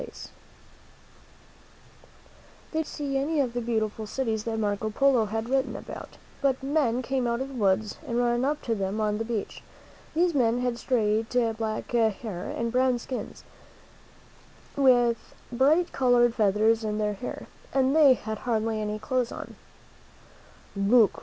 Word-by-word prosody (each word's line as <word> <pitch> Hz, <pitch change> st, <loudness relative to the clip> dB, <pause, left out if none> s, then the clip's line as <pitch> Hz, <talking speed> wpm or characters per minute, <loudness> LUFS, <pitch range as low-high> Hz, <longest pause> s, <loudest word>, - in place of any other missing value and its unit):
They -, -, -5 dB, 2.7 s
did 320 Hz, -, -1 dB
not 320 Hz, -, -1 dB
see 275 Hz, -2 st, -2 dB
any 300 Hz, +3 st, 0 dB
of 255 Hz, -4 st, 0 dB
the 245 Hz, -, -2 dB
beautiful 220 Hz, -2 st, -2 dB
cities 220 Hz, -2 st, -2 dB
that 225 Hz, -1 st, -2 dB
Marco 210 Hz, 0 st, -1 dB
Polo 255 Hz, 0 st, +3 dB
had 220 Hz, +2 st, -3 dB
written 265 Hz, +1 st, 0 dB
about, -, -, -9 dB, 0.2 s
but 270 Hz, -1 st, +1 dB
men 270 Hz, -4 st, +1 dB
came 260 Hz, 0 st, -1 dB
out 235 Hz, 0 st, 0 dB
of 265 Hz, +1 st, -4 dB
the -, -, -10 dB
woods 210 Hz, -2 st, 0 dB
and 235 Hz, -, -1 dB
ran 240 Hz, 0 st, +1 dB
up 295 Hz, +2 st, -1 dB
to 230 Hz, -, 0 dB
them 200 Hz, 0 st, -2 dB
on 210 Hz, -1 st, 0 dB
the -, -, 0 dB
beach. 225 Hz, -2 st, -4 dB, 0.5 s
These 345 Hz, +1 st, +3 dB
men 245 Hz, -3 st, +2 dB
had 245 Hz, -1 st, -1 dB
straight 220 Hz, -3 st, +1 dB, 0.3 s
black 220 Hz, -1 st, -4 dB
hair 220 Hz, -5 st, -1 dB
and 230 Hz, 0 st, -2 dB
brown 255 Hz, 0 st, +2 dB
skins, 250 Hz, +2 st, -6 dB, 1.3 s
with 245 Hz, -4 st, +3 dB, 0.2 s
bright 295 Hz, +8 st, +3 dB
colored 245 Hz, -2 st, +3 dB
feathers 220 Hz, +1 st, +2 dB
in 210 Hz, -1 st, -2 dB
their 210 Hz, -1 st, 0 dB
hair, 235 Hz, +5 st, -6 dB, 0.3 s
and 270 Hz, +1 st, +2 dB
they 290 Hz, -5 st, +7 dB
had 220 Hz, -2 st, -5 dB
hardly 225 Hz, -2 st, -1 dB
any 210 Hz, 0 st, -2 dB
clothes 250 Hz, +1 st, -1 dB
on. -, -, -8 dB, 1.2 s
"Look! 205 Hz, +2 st, +4 dB
235 Hz, 155 wpm, -27 LUFS, 220-260 Hz, 2.7 s, they